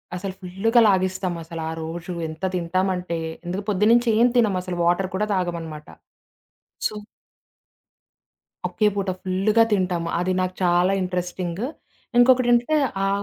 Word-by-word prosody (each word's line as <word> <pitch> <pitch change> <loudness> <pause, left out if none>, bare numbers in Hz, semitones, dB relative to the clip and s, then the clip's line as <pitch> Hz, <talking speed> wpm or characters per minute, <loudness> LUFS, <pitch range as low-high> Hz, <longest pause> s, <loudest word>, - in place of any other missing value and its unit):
అసల 190 +2 -4
ఫుల్లుగా 195 +6 +2
లాగిస్తాం 185 -1 +1
అసలా 165 -1 -6 0.2
రోజు 170 +2 -5
ఎంత 160 +3 -10
తింటామంటే 180 0 -1 0.3
ఎందుక 185 +3 -3
పొద్దున్నుంచి 225 +4 +3
ఏం 240 - +6
తినం 215 -5 +3
అసలు 180 -1 -5
వాటర్ 175 +2 +2
కూడా 210 +3 +1
తాగమనమాట. 165 -5 -3 1.0
సో - - -1 1.7
ఒకే 215 - 0
పూట 195 -2 -1
ఫుల్లుగా 200 +4 +3
తింటాము. 180 -4 0
అది 185 +1 0
నాకు 185 0 -1
చాలా 175 +1 +3
ఇంట్రెస్టింగ్. 180 +1 -3 0.6
ఇంకొకటేంటంటే 245 +2 +4 0.3
ఆ - - +1
185 Hz, 120 wpm, -23 LUFS, 175-205 Hz, 1.7 s, ఏం